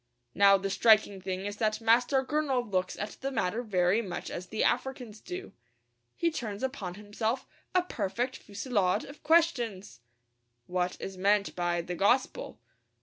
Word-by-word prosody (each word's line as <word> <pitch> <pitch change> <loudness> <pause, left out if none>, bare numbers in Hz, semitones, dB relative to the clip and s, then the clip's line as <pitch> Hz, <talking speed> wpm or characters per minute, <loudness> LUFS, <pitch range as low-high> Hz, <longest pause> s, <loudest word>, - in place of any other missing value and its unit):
Now 200 0 +6
the 195 0 -3
striking 205 -1 +4
thing 190 +1 -4
is 205 0 -4
that 215 -1 0
Master 245 +4 +3
Gurnall 270 -5 0
looks 185 -1 0
at 205 +1 -5
the 270 - -1
matter 225 -2 0
very 195 -2 +2
much 180 -5 -5
as 180 +1 -6
the 220 - -1
Africans 250 -5 -1
do. 360 +1 -7 0.6
He 335 - +1
turns 215 -7 -5
upon 210 -9 -3
himself 220 +5 -2 0.3
a 365 - +5
perfect 245 - -2
fusillade 205 -2 0
of 285 +2 -12
questions. 240 - +1 0.7
What 180 +2 -1
is 190 -1 -6
meant 200 +1 +2
by 175 -1 0
the 175 +1 -5
gospel? 205 +9 +1
210 Hz, 150 wpm, -30 LUFS, 190-250 Hz, 0.7 s, Now